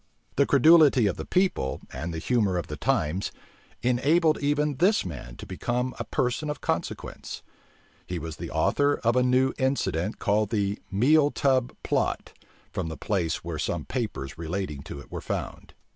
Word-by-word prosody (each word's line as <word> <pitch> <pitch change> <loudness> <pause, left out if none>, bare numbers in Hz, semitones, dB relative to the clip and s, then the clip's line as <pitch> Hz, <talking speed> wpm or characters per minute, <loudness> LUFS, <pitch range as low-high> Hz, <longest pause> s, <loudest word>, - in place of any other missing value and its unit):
The 140 - +3
credulity 145 -3 +6
of 100 - 0
the - - -6
people, 180 - +1
and 85 +2 -4
the 80 - -4
humor 100 0 +1
of 85 - -2
the - - -6
times, 80 +6 0 0.5
enabled 150 +7 +3
even 145 0 +1
this 190 - +3
man 65 -8 -7
to - - -9
become 125 +7 -2
a - - -3
person 125 +5 -1
of 150 - -3
consequence. - - -4 0.6
He 90 0 -3
was 80 -1 -6
the - - -6
author 145 0 +2
of 115 +1 +3
a 125 - +4
new 130 +1 +3
incident 105 - 0
called 105 0 +1
the 100 -2 0
meal 145 +9 +4
tub 130 -4 +1
plot, - - -1 0.4
from 90 - -2
the 80 -1 -6
place 90 -6 -1
where 80 -2 -4
some 80 -1 -2
papers 80 - -4
relating 85 -3 -3
to - - -6
it - - -14
were - - -5
found. - - -5
115 Hz, 170 wpm, -27 LUFS, 85-140 Hz, 0.6 s, credulity